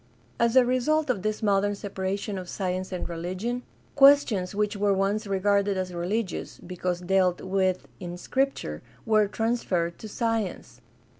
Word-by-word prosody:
As 235 Hz, +1 st, +2 dB
a 260 Hz, -1 st, +7 dB
result 255 Hz, +4 st, +2 dB
of 210 Hz, -6 st, -3 dB
this 215 Hz, +2 st, -2 dB
modern 205 Hz, 0 st, +2 dB
separation 195 Hz, 0 st, -3 dB
of 180 Hz, -1 st, -8 dB
science 185 Hz, -1 st, -3 dB
and 180 Hz, -, -3 dB
reli 170 Hz, +2 st, -4 dB
gion, 240 Hz, +6 st, -2 dB, 0.3 s
questions 275 Hz, -10 st, +5 dB
which 210 Hz, +1 st, 0 dB
were 200 Hz, -1 st, +2 dB
once 200 Hz, +3 st, 0 dB
regarded 200 Hz, 0 st, +1 dB
as 185 Hz, -1 st, -3 dB
religious, 185 Hz, +4 st, -3 dB
because 180 Hz, 0 st, -4 dB
dealt 185 Hz, 0 st, +2 dB
with 185 Hz, -1 st, 0 dB
in 175 Hz, -1 st, -6 dB
Scripture, 220 Hz, -, -1 dB, 0.2 s
were 215 Hz, -2 st, +4 dB
transferred 195 Hz, -7 st, -1 dB
to 220 Hz, -, -8 dB
science. 210 Hz, -, -2 dB
200 Hz, 150 wpm, -26 LUFS, 185-225 Hz, 0.3 s, a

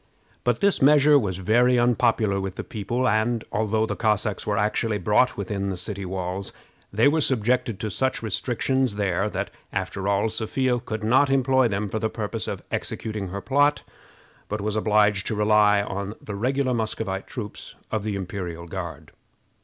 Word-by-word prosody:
But 120 Hz, -1 st, +1 dB
this 200 Hz, -1 st, +3 dB
measure 145 Hz, +1 st, +6 dB
was 95 Hz, -7 st, -2 dB
very 120 Hz, +6 st, +3 dB
unpopular 110 Hz, -4 st, +2 dB
with 95 Hz, -1 st, -4 dB
the -, -, -5 dB
people, 120 Hz, +4 st, -2 dB
and, 110 Hz, +1 st, +1 dB
although 110 Hz, +1 st, +1 dB
the 105 Hz, -2 st, -3 dB
Cossacks 105 Hz, -2 st, 0 dB
were 105 Hz, -1 st, 0 dB
actually 105 Hz, +1 st, 0 dB
brought 105 Hz, +6 st, +2 dB
within 100 Hz, 0 st, -2 dB
the 100 Hz, +1 st, -4 dB
walls, 95 Hz, +1 st, -3 dB, 0.4 s
they 110 Hz, +6 st, +4 dB
were 155 Hz, +2 st, +3 dB
subjected 120 Hz, -4 st, +1 dB
to 110 Hz, 0 st, -3 dB
such 130 Hz, +3 st, -1 dB
restrictions 125 Hz, +3 st, 0 dB
there 100 Hz, 0 st, 0 dB
that, -, -, -4 dB, 0.2 s
after 95 Hz, 0 st, -3 dB
all, 100 Hz, +2 st, +2 dB
Sophia 120 Hz, +3 st, 0 dB
could 110 Hz, -2 st, -5 dB
not 130 Hz, +6 st, +4 dB
employ 130 Hz, -1 st, +3 dB
them 105 Hz, -1 st, -2 dB
for 110 Hz, +3 st, -3 dB
the 110 Hz, -, -1 dB
purpose 110 Hz, 0 st, -4 dB
of -, -, -5 dB
executing 105 Hz, -3 st, -3 dB
her 100 Hz, +2 st, -5 dB
plot, 145 Hz, +4 st, +2 dB, 0.7 s
but 105 Hz, -, -2 dB
was 105 Hz, +1 st, -2 dB
obliged 105 Hz, -1 st, +2 dB
to 110 Hz, -, -1 dB
rely 105 Hz, -1 st, +4 dB
on 100 Hz, +1 st, -4 dB
the 105 Hz, -, -7 dB
regular 130 Hz, +5 st, 0 dB
Muscovite 110 Hz, -4 st, -3 dB
troops 105 Hz, -5 st, -8 dB, 0.2 s
of 110 Hz, -, 0 dB
the 105 Hz, 0 st, -3 dB
imperial 90 Hz, -3 st, -5 dB
Guard. 85 Hz, -, -7 dB
110 Hz, 170 wpm, -24 LUFS, 100-120 Hz, 0.7 s, measure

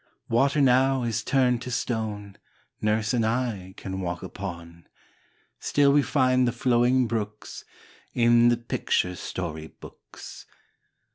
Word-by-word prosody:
Water 140 Hz, +5 st, +2 dB
now 130 Hz, 0 st, +3 dB
is 115 Hz, -2 st, -2 dB
turned 125 Hz, -2 st, +2 dB
to 125 Hz, -, -6 dB
stone 110 Hz, -4 st, -4 dB, 0.4 s
Nurse 105 Hz, +1 st, 0 dB
and 120 Hz, -2 st, +1 dB
I 110 Hz, -5 st, -2 dB
can 95 Hz, 0 st, -5 dB
walk 85 Hz, -1 st, -4 dB
upon; 85 Hz, 0 st, -8 dB, 0.7 s
Still 140 Hz, -1 st, +3 dB
we 145 Hz, -, +5 dB
find 130 Hz, -3 st, +2 dB
the -, -, +1 dB
flowing 125 Hz, +1 st, +2 dB
brooks 105 Hz, -2 st, -5 dB, 0.5 s
In 120 Hz, 0 st, +5 dB
the 120 Hz, -, +2 dB
picture 90 Hz, -5 st, -1 dB
story 80 Hz, -4 st, -5 dB
books. -, -, -13 dB
115 Hz, 125 wpm, -25 LUFS, 105-125 Hz, 0.7 s, we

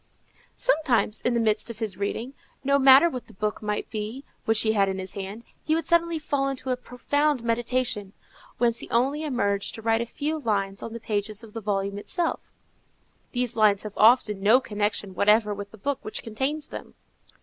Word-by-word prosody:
Sometimes, 280 Hz, -, +1 dB
in 245 Hz, -, +1 dB
the -, -, +2 dB
midst 220 Hz, 0 st, +1 dB
of 230 Hz, -, -7 dB
his 215 Hz, -4 st, -2 dB
reading, 220 Hz, +6 st, -3 dB, 0.3 s
no 280 Hz, +1 st, +3 dB
matter 270 Hz, +4 st, +8 dB
what 255 Hz, -7 st, -5 dB
the -, -, -16 dB
book 210 Hz, +1 st, -2 dB
might 210 Hz, -1 st, -2 dB
be 220 Hz, +5 st, -5 dB, 0.2 s
which 225 Hz, -2 st, +3 dB
he 220 Hz, -, +2 dB
had 200 Hz, -2 st, +2 dB
in 190 Hz, -, -3 dB
his 190 Hz, 0 st, -5 dB
hand, 200 Hz, +3 st, -6 dB, 0.2 s
he 315 Hz, -, +1 dB
would 325 Hz, -2 st, -1 dB
suddenly 335 Hz, 0 st, +2 dB
fall 285 Hz, -3 st, -1 dB
into 265 Hz, -1 st, -4 dB
a -, -, +2 dB
profound 255 Hz, +2 st, -1 dB
meditation, 230 Hz, -3 st, 0 dB, 0.4 s
whence 235 Hz, -1 st, +2 dB
he -, -, -7 dB
only 270 Hz, +6 st, +1 dB
emerged 200 Hz, -9 st, -1 dB
to 225 Hz, -, -8 dB
write 225 Hz, 0 st, +2 dB
a 235 Hz, -, -3 dB
few 300 Hz, +6 st, -3 dB
lines 200 Hz, -6 st, -1 dB
on 230 Hz, -, -6 dB
the 235 Hz, -, -6 dB
pages 215 Hz, 0 st, -3 dB
of 220 Hz, -2 st, -13 dB
the 225 Hz, -, -5 dB
volume 200 Hz, -1 st, -2 dB
itself. 340 Hz, -, -2 dB, 0.8 s
These 245 Hz, -2 st, -1 dB
lines 210 Hz, -3 st, +4 dB
have 210 Hz, -2 st, -6 dB
often 215 Hz, -3 st, +4 dB
no 220 Hz, +6 st, +6 dB
connection 205 Hz, -4 st, -2 dB
whatever 210 Hz, +2 st, +3 dB
with 205 Hz, 0 st, -7 dB
the 220 Hz, -, -14 dB
book 280 Hz, +6 st, -2 dB
which 215 Hz, -, -4 dB
contains 270 Hz, +7 st, -2 dB
them. -, -, -9 dB
225 Hz, 195 wpm, -26 LUFS, 210-265 Hz, 0.8 s, matter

